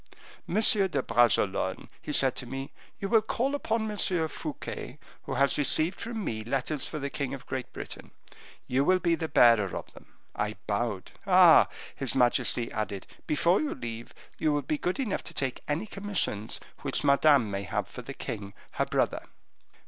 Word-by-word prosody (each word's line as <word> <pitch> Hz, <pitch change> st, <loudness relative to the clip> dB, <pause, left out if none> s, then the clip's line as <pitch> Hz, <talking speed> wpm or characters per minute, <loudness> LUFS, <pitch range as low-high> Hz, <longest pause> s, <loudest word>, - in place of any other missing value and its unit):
'Monsieur 205 Hz, 0 st, +4 dB
de 140 Hz, -8 st, -1 dB
Bragelonne,' 100 Hz, -5 st, +2 dB
he -, -, -5 dB
said 135 Hz, -3 st, +3 dB
to 125 Hz, -, -5 dB
me, 135 Hz, +2 st, -6 dB, 0.3 s
'you 195 Hz, -, -2 dB
will 225 Hz, +1 st, +4 dB
call 250 Hz, +5 st, -1 dB
upon 225 Hz, -6 st, -1 dB
M. 210 Hz, -, -6 dB, 0.3 s
Fouquet, 145 Hz, -, -6 dB, 0.3 s
who -, -, -3 dB
has 140 Hz, +1 st, +2 dB
received 155 Hz, +5 st, +2 dB
from 230 Hz, -2 st, -4 dB
me 110 Hz, -1 st, -3 dB
letters 135 Hz, +5 st, -2 dB
for 155 Hz, -, -5 dB
the 140 Hz, -1 st, -4 dB
king 140 Hz, -2 st, -3 dB
of 135 Hz, -, -12 dB
Great 130 Hz, -1 st, -5 dB
Britain; -, -, -8 dB, 0.6 s
you 130 Hz, +2 st, +1 dB
will 185 Hz, +5 st, +4 dB
be 175 Hz, -2 st, +1 dB
the 165 Hz, -1 st, -1 dB
bearer 115 Hz, -, +4 dB
of -, -, -9 dB
them.' -, -, -15 dB, 0.3 s
I 105 Hz, +1 st, -2 dB
bowed. 105 Hz, -2 st, -2 dB, 0.2 s
'Ah!' 180 Hz, -3 st, +7 dB, 0.3 s
his 135 Hz, -3 st, -2 dB
majesty 120 Hz, -1 st, +2 dB
added, 105 Hz, -3 st, -4 dB, 0.2 s
'before 170 Hz, +5 st, +3 dB
you 305 Hz, -, -2 dB
leave, 115 Hz, 0 st, -7 dB, 0.2 s
you 155 Hz, -, +2 dB
will 145 Hz, -1 st, 0 dB
be 150 Hz, +2 st, -2 dB
good 180 Hz, +7 st, -2 dB
enough 230 Hz, -8 st, -1 dB
to -, -, -7 dB
take 130 Hz, -2 st, -2 dB
any 150 Hz, +8 st, -1 dB
commissions 195 Hz, -, -2 dB, 0.2 s
which -, -, -1 dB
Madame 140 Hz, -5 st, +4 dB
may 100 Hz, 0 st, -2 dB
have 100 Hz, -, -3 dB
for -, -, -9 dB
the -, -, -8 dB
king 100 Hz, 0 st, -6 dB, 0.2 s
her -, -, 0 dB
brother. -, -, 0 dB
140 Hz, 180 wpm, -28 LUFS, 120-185 Hz, 0.6 s, Ah